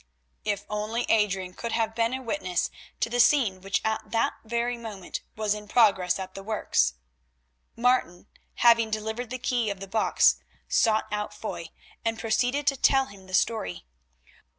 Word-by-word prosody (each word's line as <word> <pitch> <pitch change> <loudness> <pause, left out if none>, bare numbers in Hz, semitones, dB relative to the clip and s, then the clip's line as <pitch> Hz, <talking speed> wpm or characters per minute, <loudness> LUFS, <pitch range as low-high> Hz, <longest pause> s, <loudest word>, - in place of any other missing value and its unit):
If 205 -2 -2
only 215 +3 -2
Adrian 195 -4 +1
could 235 +4 -5
have 225 -1 0
been 230 +1 +1
a 260 - -6
witness 205 - -1 0.3
to - - +2
the 240 +1 -2
scene 230 -8 +4
which 195 0 0
at 220 0 -1
that 230 0 +1
very 235 +2 -1
moment 215 -6 -7
was 215 -1 0
in 210 0 -7
progress 195 -6 +4
at 190 -1 -6
the 195 - -7
works! 195 - +1 0.8
Martin 240 -8 +1 0.3
having 230 -2 +5
delivered 220 +2 -3
the 255 - -4
key 240 -3 0
of 200 -2 -4
the 195 - -7
box, 220 +3 +3 0.3
sought 225 - +3
out 210 0 -3
Foy, 175 -6 -6 0.3
and 225 0 0
proceeded 245 +6 0
to 280 - +3
tell 270 +1 +4
him 195 -4 -14
the 185 - -2
story. 90 - 0
220 Hz, 165 wpm, -27 LUFS, 195-235 Hz, 0.8 s, having